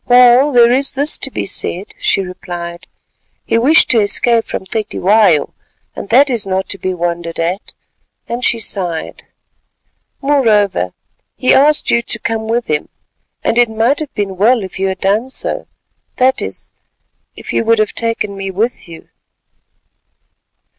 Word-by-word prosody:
"Well, 250 Hz, +3 st, +6 dB
there 240 Hz, -2 st, +5 dB
is 270 Hz, +2 st, 0 dB
this 285 Hz, +2 st, 0 dB
to -, -, -2 dB
be -, -, -4 dB
said," 190 Hz, 0 st, -5 dB
she -, -, +1 dB
replied, 175 Hz, -2 st, -7 dB, 0.6 s
"he 230 Hz, -, +1 dB
wished 300 Hz, +8 st, +4 dB
to 235 Hz, -, +4 dB
escape 225 Hz, +3 st, +2 dB
from -, -, -5 dB
Cetywayo, 205 Hz, -5 st, +1 dB, 0.4 s
and -, -, -7 dB
that 270 Hz, +5 st, +5 dB
is 240 Hz, -6 st, 0 dB
not 190 Hz, 0 st, -1 dB
to 195 Hz, -, -3 dB
be 185 Hz, -, -2 dB
wondered 170 Hz, -1 st, -3 dB
at," 175 Hz, +5 st, -3 dB, 0.5 s
and 240 Hz, +1 st, -4 dB
she 235 Hz, -, +2 dB
sighed. 180 Hz, -7 st, -3 dB, 0.9 s
"Moreover 210 Hz, -, +1 dB, 0.4 s
he 255 Hz, -, +2 dB
asked 295 Hz, +2 st, +3 dB
you 235 Hz, -, +3 dB
to 235 Hz, -, -3 dB
come 220 Hz, 0 st, -3 dB
with 235 Hz, +1 st, 0 dB
him, 150 Hz, -1 st, -2 dB, 0.5 s
and 235 Hz, -, +1 dB
it 240 Hz, -1 st, +4 dB
might 225 Hz, +6 st, +1 dB
have 305 Hz, -3 st, -5 dB
been 195 Hz, -2 st, -3 dB
well 225 Hz, +3 st, +3 dB
if 190 Hz, 0 st, -8 dB
you 195 Hz, -, 0 dB
had 190 Hz, -1 st, -4 dB
done 210 Hz, +6 st, +1 dB
so, -, -, -2 dB, 0.5 s
that 260 Hz, +1 st, +2 dB
is, -, -, -7 dB, 0.6 s
if -, -, -8 dB
you -, -, +1 dB
would 230 Hz, 0 st, +3 dB
have 215 Hz, -1 st, 0 dB
taken 225 Hz, -3 st, -2 dB
me 195 Hz, 0 st, -5 dB
with 205 Hz, 0 st, -3 dB
you!" 165 Hz, -1 st, -12 dB
220 Hz, 160 wpm, -15 LUFS, 190-245 Hz, 0.9 s, Well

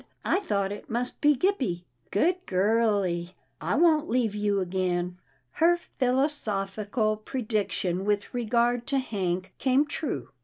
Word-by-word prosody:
I -, -, +2 dB
thought 200 Hz, -, -1 dB
it 205 Hz, -, -8 dB
must 240 Hz, +2 st, -2 dB
be 295 Hz, 0 st, +5 dB
Gippie. 255 Hz, -, 0 dB, 0.3 s
Good 360 Hz, -, +1 dB
girlie, 190 Hz, -3 st, +1 dB, 0.3 s
I 170 Hz, +6 st, 0 dB
won't 315 Hz, -1 st, +4 dB
leave 230 Hz, -3 st, +1 dB
you 205 Hz, -1 st, 0 dB
again." 180 Hz, -1 st, -1 dB, 0.3 s
Her 345 Hz, 0 st, +3 dB, 0.2 s
philosophical 215 Hz, -5 st, 0 dB
prediction 210 Hz, -6 st, -2 dB
with 205 Hz, +3 st, -1 dB
regard 240 Hz, 0 st, +1 dB
to 275 Hz, -, +1 dB
Hank 190 Hz, -7 st, -2 dB
came 265 Hz, +2 st, +3 dB
true. 290 Hz, -, -4 dB
215 Hz, 125 wpm, -27 LUFS, 195-260 Hz, 0.3 s, be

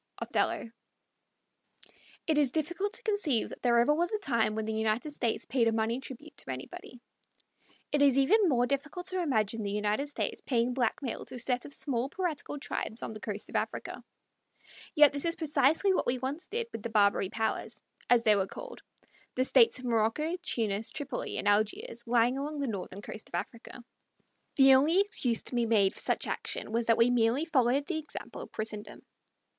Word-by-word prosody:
Othello. -, -, -1 dB, 1.6 s
It 310 Hz, -2 st, +2 dB
is 285 Hz, -3 st, +3 dB
difficult 345 Hz, -, -2 dB
to -, -, -4 dB
conceive 405 Hz, -, +1 dB
that -, -, -10 dB
there 240 Hz, -1 st, +3 dB
ever 240 Hz, +5 st, +4 dB
was 345 Hz, +3 st, 0 dB
a 430 Hz, -, 0 dB
time 230 Hz, -, 0 dB
when 220 Hz, 0 st, -2 dB
the 220 Hz, -, -2 dB
United 220 Hz, +6 st, -1 dB
States 240 Hz, -6 st, -2 dB
paid 245 Hz, -3 st, +1 dB
a -, -, +3 dB
money 225 Hz, +2 st, 0 dB
tribute 275 Hz, +3 st, -10 dB
to -, -, -8 dB
anybody. 130 Hz, -, -8 dB, 0.9 s
It 290 Hz, -, +2 dB
is 275 Hz, -2 st, +5 dB
even 380 Hz, +8 st, +4 dB
more 245 Hz, -3 st, +3 dB
difficult 285 Hz, +7 st, -3 dB
to 370 Hz, -1 st, -1 dB
imagine 225 Hz, -, 0 dB
the 205 Hz, -, -3 dB
United 210 Hz, +6 st, -1 dB
States 290 Hz, -, -3 dB
paying 245 Hz, -1 st, 0 dB
blackmail 245 Hz, 0 st, -2 dB
to 255 Hz, -, -7 dB
a -, -, -6 dB
set 245 Hz, +1 st, -1 dB
of 285 Hz, -, -5 dB
small 260 Hz, -2 st, -2 dB
piratical 325 Hz, -5 st, -3 dB
tribes 230 Hz, -5 st, -4 dB
on -, -, -5 dB
the 215 Hz, -, -8 dB
coast 210 Hz, -1 st, -5 dB
of -, -, -10 dB
Africa. -, -, -3 dB, 0.9 s
Yet 295 Hz, -2 st, +7 dB
this 285 Hz, -, -2 dB
is 335 Hz, 0 st, 0 dB
precisely 320 Hz, +4 st, +2 dB
what -, -, 0 dB
we 245 Hz, +1 st, +2 dB
once 275 Hz, +7 st, -4 dB
did 465 Hz, +4 st, -2 dB
with -, -, -6 dB
the 235 Hz, -, -4 dB
Barbary 200 Hz, -3 st, +3 dB
powers, 220 Hz, +1 st, -2 dB, 0.3 s
as 245 Hz, -1 st, +5 dB
they 215 Hz, -2 st, +5 dB
were 195 Hz, -1 st, 0 dB
called -, -, -9 dB, 0.5 s
the 255 Hz, -, +1 dB
States 250 Hz, -3 st, +5 dB
of 255 Hz, -, -8 dB
Morocco, 235 Hz, +8 st, +1 dB
Tunis, 220 Hz, -, -1 dB
Tripoli, 285 Hz, -4 st, -4 dB
and -, -, -2 dB
Algiers, 215 Hz, +3 st, 0 dB
lying 240 Hz, +2 st, +3 dB
along 295 Hz, +1 st, -4 dB
the 280 Hz, -, -1 dB
northern 200 Hz, -3 st, -5 dB
coast 215 Hz, -, -8 dB
of -, -, -6 dB
Africa. 240 Hz, +1 st, -6 dB, 0.7 s
The 270 Hz, -1 st, +7 dB
only 300 Hz, +8 st, +4 dB
excuse 255 Hz, -, +1 dB
to -, -, -4 dB
be 240 Hz, -1 st, +1 dB
made 205 Hz, -4 st, +3 dB
for -, -, -11 dB
such -, -, 0 dB
action -, -, -4 dB
was 230 Hz, +1 st, -1 dB
that 230 Hz, -, +4 dB
we 235 Hz, +1 st, +4 dB
merely 245 Hz, +5 st, +2 dB
followed 275 Hz, -3 st, +2 dB
the 325 Hz, -2 st, -2 dB
example 305 Hz, -, -6 dB
of -, -, -10 dB
Christendom. 215 Hz, -1 st, -6 dB
250 Hz, 195 wpm, -30 LUFS, 225-295 Hz, 1.6 s, Yet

